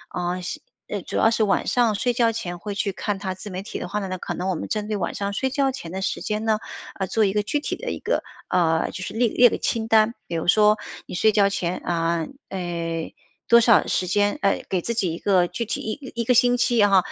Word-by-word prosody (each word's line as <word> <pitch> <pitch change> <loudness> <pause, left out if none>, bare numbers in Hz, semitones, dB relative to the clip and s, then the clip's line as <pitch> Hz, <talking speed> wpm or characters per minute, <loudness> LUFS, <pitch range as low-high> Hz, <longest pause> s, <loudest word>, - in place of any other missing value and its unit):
嗯， 180 +1 -2
习 175 - -5 0.3
呃， 205 - -3
主 - - -7
要 225 - +4
是 225 - +2
晚 200 -2 +1
上 235 -4 +2
睡 245 +4 +1
觉 235 -1 +3
前 175 -6 -5
会 205 +2 -5
去 205 0 0
看 205 +1 -3
它 190 -1 -3
自 190 +3 -9
媒 185 +1 -5
体 - - -6
的 - - -5
话 210 - -2
呢 195 - -4
呢， - - -8
那 - - -6
可 - - -5
能 185 +2 -3
我 185 - 0
们 - - -5
针 210 -1 -2
对 210 -1 -1
晚 - - -3
上 200 0 -2
睡 265 +6 0
觉 275 -1 +1
前 175 -11 -8
的 190 +1 -4
时 - - -2
间 210 0 -2
呢， 215 -1 +2 0.4
呃， 190 - -1
做 220 +3 +2
一 195 - +1
个 210 - +2
具 250 +8 -1
体 - - -3
的 - - -5
一 - - -4
个 - - 0 0.3
呃， 165 -3 +2
就 - - -7
是 185 - -5
列 230 +1 +2
列 245 +2 +6
个 - - -2
清 225 -1 -1
单。 220 0 +4
比 170 - -4
如 165 - -2
说 210 +2 +5 0.3
你 - - -7
睡 220 +4 +4
觉 200 -2 +4
前， 180 -2 -2
啊， 165 -1 -1 0.2
哎， 170 -3 -4 0.3
多 235 0 +7
少 230 -2 +5
时 185 - 0
间 205 +3 +1
呃， 195 0 +2
给 185 -2 0
自 235 - -2
己 190 -7 0
一 - - -5
个 185 -3 +3
具 235 - -4
体 225 - -3
1 255 +5 -5
1 - - 0
个 250 - +4
星 245 0 +4
期， 245 0 +2
然 205 -2 +5
后， 195 - +7
205 Hz, 285 characters per minute, -23 LUFS, 180-225 Hz, 0.4 s, 多